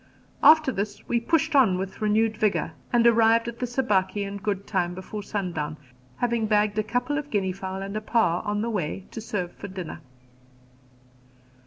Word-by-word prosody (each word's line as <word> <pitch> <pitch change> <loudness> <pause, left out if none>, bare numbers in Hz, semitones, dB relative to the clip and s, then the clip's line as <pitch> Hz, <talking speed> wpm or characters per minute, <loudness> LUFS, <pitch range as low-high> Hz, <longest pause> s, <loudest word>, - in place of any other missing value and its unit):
After 310 -3 +7
this 205 -2 -4
we 235 - +1
pushed 315 +5 +1
on 225 -10 +5
with 190 +3 -5
renewed 215 +1 +2
vigour, 215 -2 0 0.2
and 235 -1 +3
arrived 230 0 +5
at 235 0 -6
the 250 - -1
Sabaki 210 -5 0
in 200 0 -5
good 200 -1 -3
time 175 -3 -1
before 190 +3 -6
sundown, 170 -7 -3 0.4
having 235 -2 0
bagged 210 0 +2
a - - +1
couple 245 +6 -1
of 290 -1 -7
guinea 195 -5 0
fowl 190 0 -5
and 200 +1 -6
a 215 - -2
paa 215 -6 +2
on 205 0 -2
the 235 - -1
way 190 -2 -3
to 225 - -6
serve 185 -5 -3
for 200 - -8
dinner. 185 -4 -7
210 Hz, 180 wpm, -25 LUFS, 190-235 Hz, 0.4 s, After